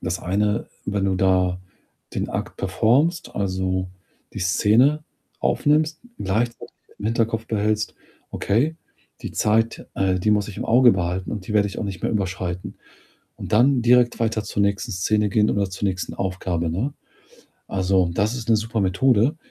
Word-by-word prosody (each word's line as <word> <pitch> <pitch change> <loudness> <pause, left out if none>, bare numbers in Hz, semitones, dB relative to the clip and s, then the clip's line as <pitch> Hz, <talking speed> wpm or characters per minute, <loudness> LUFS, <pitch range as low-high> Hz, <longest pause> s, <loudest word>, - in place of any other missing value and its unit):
das 90 0 -3
eine, 105 +4 0 0.2
wenn 100 -1 -1
du 95 -1 +1
da 90 -1 +2 0.5
den - - -2
Akt - - -4
performst, 120 - +1
also, 95 -1 -1 0.5
die - - -5
Szene 120 +11 +3 0.4
aufnimmst, 155 +2 +1 0.2
gleichzeitig 115 +5 -2 0.2
dann - - -24
im 100 - -8
Hinterkopf 115 0 0
behältst: 105 0 -1 0.4
„Okay, 135 +11 0 0.5
die - - -5
Zeit, 115 +2 +1
äh, 95 -1 +1
die 105 - +1
muss 105 -1 +2
ich 105 - -8
im - - -4
Auge 120 +1 +6
behalten 90 0 -2
und 100 -4 -6
die 105 - -3
werde 100 -1 +3
ich - - -7
auch - - -3
nicht 95 -4 -6
mehr - - 0
überschreiten.“ 95 -3 -3 0.6
Und - - -8
dann 125 +4 +4
direkt 120 0 +4
weiter 110 -2 0
zur 100 -1 -2
nächsten 100 +3 0
Szene 105 +3 +1
gehen 105 +1 +2
oder 100 -2 0
zur 95 +2 -2
nächsten 90 -1 -3
Aufgabe, 90 -3 -2
ne? 115 - -2 0.7
Also, 95 -2 +1
das 105 +6 0
ist 115 -2 -6
'ne 115 - +6
super 110 0 -2
Methode, 115 - +2
105 Hz, 165 wpm, -23 LUFS, 95-115 Hz, 0.7 s, Auge